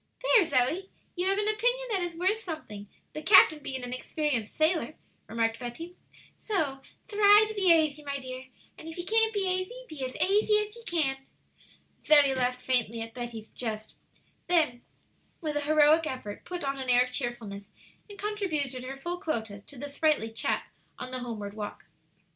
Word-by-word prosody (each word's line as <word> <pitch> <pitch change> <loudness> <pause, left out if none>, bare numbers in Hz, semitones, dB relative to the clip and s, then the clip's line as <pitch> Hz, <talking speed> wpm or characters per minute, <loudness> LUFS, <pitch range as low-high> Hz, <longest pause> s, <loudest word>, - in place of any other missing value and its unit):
"There, - - +6
Zoe, 315 +7 0 0.3
you 360 +1 -1
have 390 +1 +2
an 415 0 0
opinion 485 +4 +1
that 390 -3 0
is 350 -1 -3
worth 380 +5 +1
something, 310 - -7 0.3
the 305 - -5
captain 315 -3 +6
being 265 -2 -5
an 245 0 -4
experienced 255 -4 -2
sailor," 315 -1 +1 0.3
remarked 225 0 -1
Betty. 325 +9 -7 0.4
"So 305 -11 -1 0.3
thry 415 0 +6
to 435 - -5
be 385 -4 +3
aisy, 310 -2 +3
my 280 -1 -3
dear, 260 -1 -8 0.3
and 320 - -10
if 325 - -8
ye 350 - -5
can't 445 +2 +3
be 405 -3 -1
aisy, 370 +7 -2
be 295 -4 -7
as 255 0 -4
aisy 420 +2 +3
as 420 +2 -13
ye 470 - -12
can!" 295 -6 +1 0.9
Zoe 290 -3 +6
laughed 250 -1 -1
faintly 235 -3 +1
at 225 0 -6
Betty's 235 -3 -7
jest; 215 -3 -5 0.5
then, 310 -9 +2 0.6
with 305 -3 -3
a 295 - 0
heroic 310 +2 +4
effort, 230 -7 -6
put 355 -1 -5
on 275 0 -2
an 260 -1 -4
air 245 0 +6
of 250 - -7
cheerfulness, 230 -6 -4 0.4
and 405 - -10
contributed 320 -12 -2
her 265 +1 -6
full 345 +5 -4
quota 220 - -3
to 285 - -12
the 285 +4 -5
sprightly 285 -5 +1
chat 225 - -1 0.3
on 255 0 -6
the 255 - -3
homeward 220 -5 -6
walk. 210 -1 -7
295 Hz, 180 wpm, -28 LUFS, 250-365 Hz, 0.9 s, There